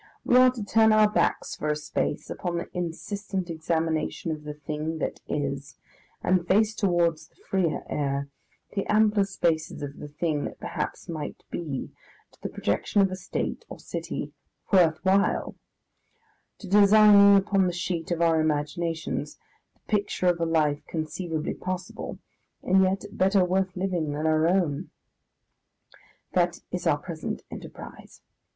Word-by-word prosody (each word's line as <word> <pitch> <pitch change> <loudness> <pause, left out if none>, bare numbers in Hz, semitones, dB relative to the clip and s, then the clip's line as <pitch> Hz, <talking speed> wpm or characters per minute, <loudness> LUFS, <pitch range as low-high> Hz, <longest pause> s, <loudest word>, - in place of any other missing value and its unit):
We 245 - +3
are 255 0 +8
to 245 -4 -5
turn 220 +2 +4
our 215 0 +6
backs 210 - 0
for 155 - -4
a 150 - +2
space 150 - -3
upon 175 -2 -3
the 170 - -4
insistent 185 +2 -4
examination 160 0 -1
of 150 -1 -6
the 150 0 -5
thing 150 +2 -4
that - - -3
is, 140 -1 -3 0.5
and 180 -1 +2
face 215 +3 +3
towards 170 -6 +1
the - - -36
freer 185 -5 -1
air, 140 -1 -1 0.5
the 195 - -2
ampler 210 -1 +4
spaces 165 -6 -1
of 140 0 -6
the - - -7
thing 150 0 -2
that - - -7
perhaps - - -4
might 155 -3 -6
be, 150 -6 -4 0.4
to - - -26
the - - -4
projection 155 - +1
of 190 - +1
a - - -2
State 185 - -4
or - - -8
city - - -5 0.4
"worth 170 -2 +4
while," 195 +1 +2 1.0
to 205 - -10
designing 200 0 +7
upon 195 -1 +2
the - - 0
sheet 175 -1 -3
of 170 -1 0
our 165 -1 +4
imaginations 155 +2 -2 0.4
the - - -36
picture 205 -3 -1
of 175 -1 +3
a 165 - +1
life 150 -3 +1
conceivably 160 0 -3
possible, 185 0 -5 0.5
and 190 +1 +4
yet 190 +2 +1
better 190 0 +3
worth 185 +1 0
living 180 -5 -1
than 150 +2 -3
our 155 0 +3
own. 170 -6 +1 1.4
That - - +2
is - - -2
our - - +4
present - - -5
enterprise. - - -10
175 Hz, 150 wpm, -26 LUFS, 155-195 Hz, 1.4 s, are